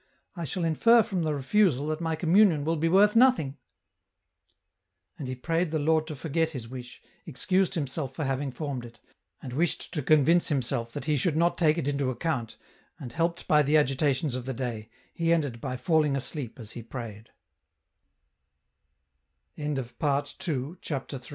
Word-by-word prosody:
I 170 -2 -4
shall 170 +5 -2
infer 230 +8 +5
from 195 -5 -2
the 155 -2 0
refusal 145 0 +2
that 155 +1 -2
my 165 -1 -1
communion 170 -2 +4
will 165 +1 +1
be 165 +1 +1
worth 205 +4 +5
nothing! 225 - +4 0.8
" - - -49
And 140 - -5
he 130 - -3
prayed 165 +6 -1
the 160 - -1
Lord 155 +1 +2
to 155 - -5
forget 160 +3 0
his 130 -8 -7
wish, 125 0 -9 0.2
excused 185 +7 +1
himself 140 -3 -3
for 155 - -3
having 135 +1 -1
formed 135 -2 -4
it, 120 0 -12 0.4
and 125 - -6
wished 165 +5 -1
to 150 - -1
convince 155 +4 +4
himself 125 -4 -1
that 145 -3 -5
He 150 -2 +1
should 155 +3 0
not 170 +1 +3
take 155 -2 +3
it 155 -5 -2
into 140 -2 0
account, 130 -3 -3 0.4
and, 120 -3 -8
helped 170 +1 -1
by 150 0 +5
the 150 +2 +3
agitations 140 -1 +1
of 125 0 -4
the 135 - -3
day, 115 -3 -4 0.2
he 165 0 0
ended 145 -8 0
150 Hz, 145 wpm, -27 LUFS, 130-165 Hz, 0.8 s, infer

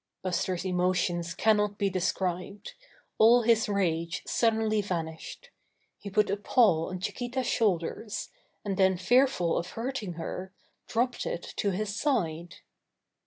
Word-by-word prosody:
Buster's 185 0 -1
emotions 180 -2 0
cannot 210 -2 +2
be 200 - +1
described. 185 - -2 0.5
All 235 +2 +6
his 230 +1 +3
rage 170 -3 -1
suddenly 220 -2 +1
vanished. 170 - -5 0.5
He 200 - -7
put 210 0 +2
a 200 - 0
paw 205 -7 +3
on 185 0 -5
Chiquita's 245 +6 -3
shoulders, 210 0 -1 0.4
and 195 -2 -2
then 190 -2 +3
fearful 210 -3 +3
of 170 - -5
hurting 230 -5 -4
her, 185 +3 -6 0.3
dropped 245 +2 -1
it 170 - -5
to 205 - +1
his 200 +2 -2
side. 175 - -1
195 Hz, 125 wpm, -28 LUFS, 180-225 Hz, 0.5 s, All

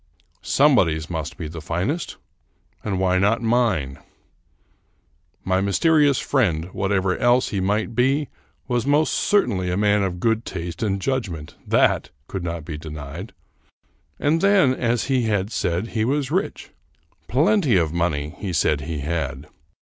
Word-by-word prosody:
Somebody's 90 - +2
must 80 -2 -4
be 80 - -5
the 80 +1 -8
finest, 90 - -2 0.7
and 100 -3 -2
why 95 -1 +2
not 105 +4 +2
mine? 110 - +1 1.4
My 95 0 +1
mysterious 145 - +3
friend, 90 - 0
whatever 95 -1 0
else 120 +1 +3
he 100 - -2
might 105 +4 0
be, 135 +5 +2 0.4
was 120 -1 -1
most 150 +2 +3
certainly 100 - +1
a 90 - -1
man 105 0 +3
of 90 -2 -2
good 115 +2 +1
taste 85 -4 -6
and 100 -3 0
judgment; 95 - -3
that - - +2 0.2
could 95 -3 -5
not 85 -2 -4
be 80 -3 -6
denied. 75 +5 -8 0.9
And 160 +3 +1
then, 195 -9 +4
as 120 -2 0
he 130 -3 +1
had 105 -1 0
said, 90 +4 -1
he 110 -1 -1
was 135 +2 0
rich. - - -2 0.3
" 80 +2 -40
Plenty 150 - +3
of 80 -2 0
money," 75 -4 -1
he 95 -3 -4
said 75 -2 +1
he 75 0 -4
had. 75 -2 -3
95 Hz, 145 wpm, -22 LUFS, 85-125 Hz, 1.4 s, then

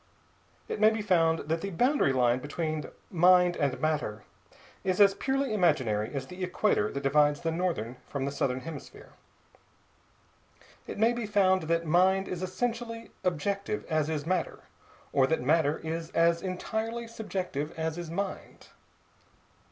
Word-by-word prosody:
It - - -4
may 215 +1 +7
be 220 -1 -2
found 165 -5 +3
that 165 +1 -1
the 200 - -3
boundary 245 - +2
line 125 -1 +2
between 155 +2 -3 0.3
mina 180 0 +5
and 140 -4 0
matter 150 -9 -1 0.6
is 185 0 0
as 200 -1 +7
purely 270 +1 -1
imaginary 130 - +1
as 135 -2 -4
the 180 +5 -7
equator 180 - +1
that 140 0 -5
divides 145 +1 +3
the 165 - -1
northern 160 -9 -2
from 140 -2 -3
the 140 - -2
southern 130 -2 -1
hemisphere. 160 -2 -10 1.8
It - - -6
may 225 +3 +3
be 240 -3 -3
found 190 -4 +2
that 170 0 +1
mind 185 +4 +3
is 180 -1 -4
essentially 230 +4 -3
objective 195 +4 -1
as 155 -2 0
is 150 -2 -2
matter, 180 0 -2 0.5
or 135 -2 +4
that 160 -3 0
matter 150 +1 +2
is 160 0 -5
as 170 0 +3
entirely 220 +5 -3
Subjective 185 -9 -4
as 160 +1 -2
is 170 -2 -6
mind. 195 +4 -5
170 Hz, 150 wpm, -29 LUFS, 150-195 Hz, 1.8 s, may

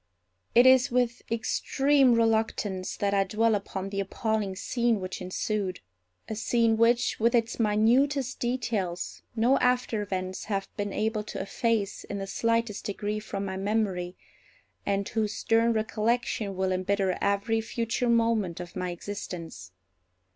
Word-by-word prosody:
It 240 +2 +7
is 260 -1 +6
with 245 -1 0
extreme 270 +3 +2
reluctance 220 -4 0
that 200 0 0
I 195 -1 +4
dwell 220 +3 +1
upon 195 -1 -3
the 200 0 -3
appalling 205 0 -1
scene 235 +2 0
which 185 0 -5
ensued; 185 +1 -2 0.5
a - - -4
scene 225 +1 +2
which, 235 +2 +2
with 235 +2 +3
its 230 0 0
minutest 245 +5 +2
details, 230 -8 -2
no 245 +4 +3
after 250 -3 +1
events 185 -2 -4
have 195 -2 -2
been 205 0 -3
able 215 +1 -1
to - - -6
efface 205 +1 -1
in 200 - -5
the 195 - -3
slightest 230 +1 -1
degree 205 +1 -2
from 200 -2 -4
my 190 -1 -4
memory, 195 -3 -1 0.7
and 200 0 0
whose 220 -1 -1
stern 230 +1 +2
recollection 220 -1 -1
will 190 0 0
embitter 185 0 0
every 200 +3 +1
future 230 +2 -1
moment 225 -7 +2
of 175 -1 -8
my 180 -1 -2
existence. 175 - -7
215 Hz, 140 wpm, -28 LUFS, 195-230 Hz, 0.7 s, It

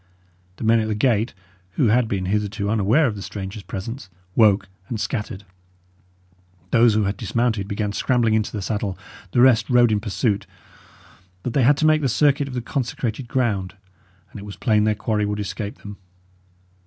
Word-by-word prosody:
The - - -8
men 115 +1 +4
at 110 - -1
the 110 - -1
gate, 115 -1 +1 0.4
who 115 +3 +2
had 120 +1 +3
been 95 -3 -2
hitherto 105 +1 -1
unaware 110 +8 +3
of 115 -6 -1
the 100 - -7
stranger's 95 +2 -6
presence, 100 +5 -7 0.3
woke 100 -3 +4 0.2
and 115 - -3
scattered. 105 -4 -4 1.3
Those 115 -2 +5
who 110 - +2
had 100 +1 -1
dismounted 110 -2 -1
began 100 0 -2
scrambling 115 +1 +1
into 110 -1 +1
the 105 -3 -4
saddle; 100 -2 -2 0.3
the 120 - +2
rest 125 -3 +5
rode 120 -2 +5
in 105 - +2
pursuit; 105 -1 -1 1.0
but 125 - -3
they 140 - +2
had 140 +4 +5
to 155 - +1
make 155 0 +4
the 135 - +1
circuit 140 +2 +2
of 130 - -7
the 125 - -3
consecrated 120 -2 -3
ground, 110 -8 -1 0.6
and - - -9
it - - -9
was 100 -1 -8
plain 105 -4 +2
their 110 0 +2
quarry 105 0 -1
would 105 0 -2
escape 100 +1 -5
them. 105 0 -8
110 Hz, 180 wpm, -22 LUFS, 100-120 Hz, 1.3 s, Those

